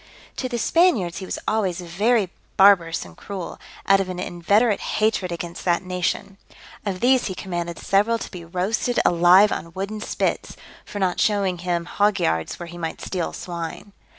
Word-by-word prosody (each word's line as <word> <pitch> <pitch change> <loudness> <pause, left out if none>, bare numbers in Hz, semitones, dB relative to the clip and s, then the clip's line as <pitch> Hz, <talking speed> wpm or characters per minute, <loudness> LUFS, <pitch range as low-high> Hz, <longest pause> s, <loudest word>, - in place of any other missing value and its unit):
To 255 - -2
the 240 - -2
Spaniards 235 - +2
he 190 - -7
was - - -3
always 195 -5 0
very 195 +3 +1 0.3
barbarous 180 - +5
and 85 -2 -14
cruel, 190 -4 -7 0.3
out 195 0 +5
of 190 -1 -2
an 180 - -4
inveterate 200 +5 +1 0.2
hatred 215 -4 +1
against 170 0 -6
that 175 0 +2
nation. 185 +2 -2 0.5
Of 185 -2 -3
these 255 0 +4
he 190 - -4
commanded 175 -3 -4
several 210 +4 +2
to - - -7
be 180 -3 -8
roasted 190 +8 -1
alive 180 +4 +6
on 165 +1 -4
wooden 200 +3 -4
spits, - - -2 0.3
for - - -8
not 185 -3 0
showing 195 -4 +1
him 175 -1 -1
hog 205 +3 +1
yards 80 0 -1
where 175 - -5
he 175 +1 -10
might 165 -1 -4
steal 180 -3 -3
swine. 175 +3 -6
185 Hz, 175 wpm, -23 LUFS, 175-205 Hz, 0.5 s, alive